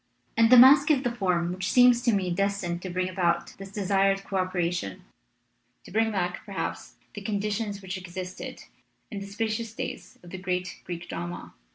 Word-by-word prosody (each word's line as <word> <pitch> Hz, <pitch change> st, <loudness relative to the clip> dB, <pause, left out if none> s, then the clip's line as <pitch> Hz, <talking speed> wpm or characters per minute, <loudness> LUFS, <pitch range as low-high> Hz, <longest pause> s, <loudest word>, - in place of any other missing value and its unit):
And 230 Hz, 0 st, +5 dB
the 250 Hz, -, +10 dB
masque 275 Hz, +4 st, +8 dB
is 280 Hz, -3 st, +3 dB
the 245 Hz, -, 0 dB
form 180 Hz, -5 st, 0 dB
which 185 Hz, 0 st, -2 dB
seems 245 Hz, -1 st, +6 dB
to 245 Hz, -, +2 dB
me 190 Hz, -4 st, 0 dB
destined 185 Hz, -2 st, -1 dB
to 185 Hz, -, -5 dB
bring 180 Hz, +1 st, -1 dB
about 175 Hz, -2 st, 0 dB
this 195 Hz, 0 st, -9 dB
desired 195 Hz, -1 st, +1 dB
co 195 Hz, -, -3 dB
operation, 180 Hz, -, -2 dB, 0.8 s
to -, -, -13 dB
bring 220 Hz, +2 st, +2 dB
back, 180 Hz, -3 st, -2 dB
perhaps, 200 Hz, -2 st, -5 dB, 0.2 s
the 205 Hz, -, -7 dB
conditions 205 Hz, 0 st, -2 dB
which 190 Hz, 0 st, -5 dB
existed 185 Hz, 0 st, -7 dB, 0.5 s
in 205 Hz, -, -4 dB
the 200 Hz, -, -7 dB
spacious 220 Hz, +2 st, -3 dB
days -, -, -6 dB
of 175 Hz, -, -12 dB
the 190 Hz, -, -6 dB
great 180 Hz, -1 st, -3 dB
Greek 175 Hz, -1 st, -6 dB
drama. 85 Hz, +1 st, -6 dB
195 Hz, 180 wpm, -27 LUFS, 180-215 Hz, 0.8 s, the